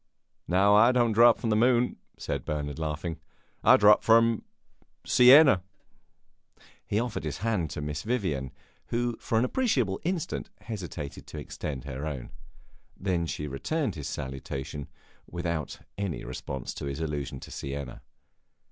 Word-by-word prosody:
"No, 95 Hz, +3 st, +4 dB
I 115 Hz, +4 st, +7 dB
don't 120 Hz, -2 st, +3 dB
drop 115 Hz, +2 st, +6 dB
from 115 Hz, -, -2 dB
the -, -, +3 dB
moon," 120 Hz, +2 st, +3 dB, 0.2 s
said -, -, -3 dB
Bernard, 75 Hz, 0 st, -3 dB
laughing. 80 Hz, +1 st, -3 dB, 0.4 s
"I -, -, +7 dB
drop 105 Hz, 0 st, +6 dB
from 115 Hz, 0 st, +4 dB, 0.6 s
Siena!" 130 Hz, -, +7 dB, 1.3 s
He 105 Hz, -, +1 dB
offered 120 Hz, -1 st, -3 dB
his 75 Hz, -2 st, -3 dB
hand 100 Hz, -9 st, 0 dB
to 75 Hz, -, -5 dB
Miss 75 Hz, 0 st, -3 dB
Vivian, 90 Hz, -, -2 dB, 0.4 s
who 120 Hz, 0 st, -1 dB
for 115 Hz, -, -1 dB
an 115 Hz, -, +3 dB
appreciable 130 Hz, -, 0 dB
instant 175 Hz, -2 st, -2 dB
hesitated 90 Hz, -9 st, -7 dB
to -, -, -9 dB
extend 70 Hz, -4 st, -5 dB
her 70 Hz, +2 st, -5 dB
own. 70 Hz, -5 st, -6 dB, 0.7 s
Then 90 Hz, -3 st, 0 dB
she 75 Hz, -, -4 dB
returned 120 Hz, -, -2 dB
his 75 Hz, -4 st, -6 dB
salutation, 65 Hz, +1 st, -5 dB, 0.4 s
without 85 Hz, -4 st, -3 dB, 0.2 s
any 100 Hz, -6 st, -3 dB
response 65 Hz, +1 st, -5 dB
to -, -, -6 dB
his 70 Hz, +2 st, -4 dB
allusion 75 Hz, -4 st, -3 dB
to -, -, -11 dB
Siena. 70 Hz, -1 st, -6 dB
90 Hz, 140 wpm, -28 LUFS, 75-115 Hz, 1.3 s, I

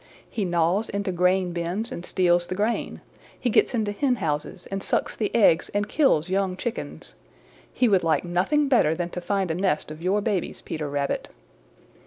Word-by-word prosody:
He 210 Hz, -, -3 dB
gnaws 175 Hz, +4 st, +1 dB
into 200 Hz, -1 st, -2 dB
grain 180 Hz, +1 st, +2 dB
bins 175 Hz, +7 st, -2 dB
and 170 Hz, -, -6 dB
steals 175 Hz, -2 st, +2 dB
the 185 Hz, -, -3 dB
grain. 215 Hz, +4 st, -1 dB, 0.4 s
He 245 Hz, -, 0 dB
gets 250 Hz, -, +3 dB
into 215 Hz, -3 st, 0 dB
hen 255 Hz, +5 st, +1 dB
houses 150 Hz, -1 st, -3 dB
and 195 Hz, 0 st, -2 dB
sucks -, -, -1 dB
the 210 Hz, -, -1 dB
eggs 195 Hz, -7 st, +4 dB
and 205 Hz, +1 st, +1 dB
kills 215 Hz, -, +2 dB
young 190 Hz, -1 st, 0 dB
chickens. 235 Hz, +3 st, -5 dB, 0.6 s
He 250 Hz, -, +2 dB
would 195 Hz, -5 st, +3 dB
like 160 Hz, 0 st, +1 dB
nothing 190 Hz, +13 st, +1 dB
better 235 Hz, -, +3 dB
than 175 Hz, +1 st, -3 dB
to 180 Hz, -, -5 dB
find 190 Hz, -1 st, -1 dB
a -, -, 0 dB
nest 175 Hz, -4 st, -1 dB
of 155 Hz, +1 st, -9 dB
your 190 Hz, +4 st, +1 dB
babies, 205 Hz, -4 st, -2 dB
Peter 155 Hz, -2 st, -4 dB
Rabbit." 140 Hz, 0 st, -2 dB
185 Hz, 185 wpm, -25 LUFS, 170-210 Hz, 0.6 s, eggs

